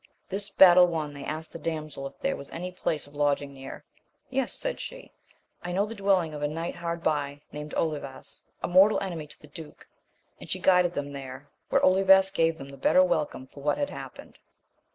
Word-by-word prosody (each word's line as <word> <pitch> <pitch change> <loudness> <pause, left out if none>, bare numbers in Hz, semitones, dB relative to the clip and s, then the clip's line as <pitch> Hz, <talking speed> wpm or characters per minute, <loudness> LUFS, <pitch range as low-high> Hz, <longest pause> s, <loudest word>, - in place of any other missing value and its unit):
This 200 +1 -2
battle 180 -2 +8
won,' 155 -4 -3
they 140 -1 -8
asked 155 +3 -5
the 165 - -7
damsel 155 -3 -4
if - - -14
there 275 0 -1
was 140 - -9
any 180 +2 -5
place 160 -4 -2
of 145 - -17
lodging 145 -1 0
near. 135 0 -9 0.5
Yes, 265 -1 0
said - - -3
she, - - -8 0.5
I 175 - -5
know 195 +3 +1
the 220 - -7
dwelling 195 -6 +1
of 150 - -6
a 145 - +1
knight 165 +3 -4
hard 170 0 -4
by, 145 -2 -1
named 150 0 -7
Olivas, 145 -4 -4 0.2
a - - 0
mortal 190 +4 +5
enemy 170 -6 -5
to - - -15
the - - -14
duke; 150 +1 -12 0.5
and - - -11
she - - -1
guided 180 -2 +4
them 145 0 -4
there, 135 0 -9 0.2
where - - +3
Olivas 190 +1 +5
gave 165 0 +1
then 135 -1 -9
the 140 - -11
better 185 +7 +5
welcome 150 -7 -1
for 140 +2 -14
what 145 +1 +1
had 285 - -2
happened. - - -10
160 Hz, 205 wpm, -27 LUFS, 145-185 Hz, 0.5 s, battle